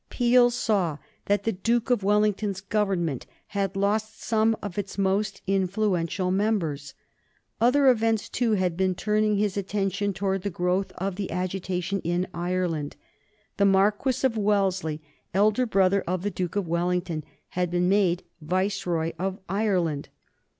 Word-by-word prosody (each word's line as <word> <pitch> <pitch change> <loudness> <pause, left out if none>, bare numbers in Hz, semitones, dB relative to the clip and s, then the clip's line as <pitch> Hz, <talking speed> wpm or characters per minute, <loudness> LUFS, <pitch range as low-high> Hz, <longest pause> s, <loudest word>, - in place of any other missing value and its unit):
Peel 245 0 +4
saw 200 -10 0 0.3
that 205 0 +1
the 225 - +1
Duke 230 +5 0
of 245 - +3
Wellington's 210 -1 +1
Government 195 - -1 0.2
had 195 -1 -2
lost 210 +2 0
some 220 0 +2
of 205 -1 -5
its 200 0 -5
most 195 +1 0
influential 190 -2 0
members. 170 -9 -1 0.6
Other 260 +4 +4
events, 225 -3 +3
too, 235 -3 0
had 185 -4 +1
been 185 0 +1
turning 210 +2 +1
his 205 -1 0
attention 200 0 -1
towards 195 0 -2
the 200 - -1
growth 180 +2 -1
of 190 0 -3
the 200 -2 -3
agitation 185 +1 -2
in 175 +2 0
Ireland. 175 -4 -2 0.6
The 200 - +4
Marquis 205 +7 +2
of 250 -3 +2
Wellesley, 190 -7 0 0.3
elder 215 +5 +3
brother 195 -2 +3
of 180 0 -1
the 205 - -1
Duke 180 -2 -3
of 200 -4 -1
Wellington, 175 -1 -1 0.3
had 180 -1 -1
been 180 +1 +2 0.2
Viceroy 180 -1 -1
of 190 +1 -2
Ireland. 180 -7 0
195 Hz, 140 wpm, -26 LUFS, 180-210 Hz, 0.6 s, Peel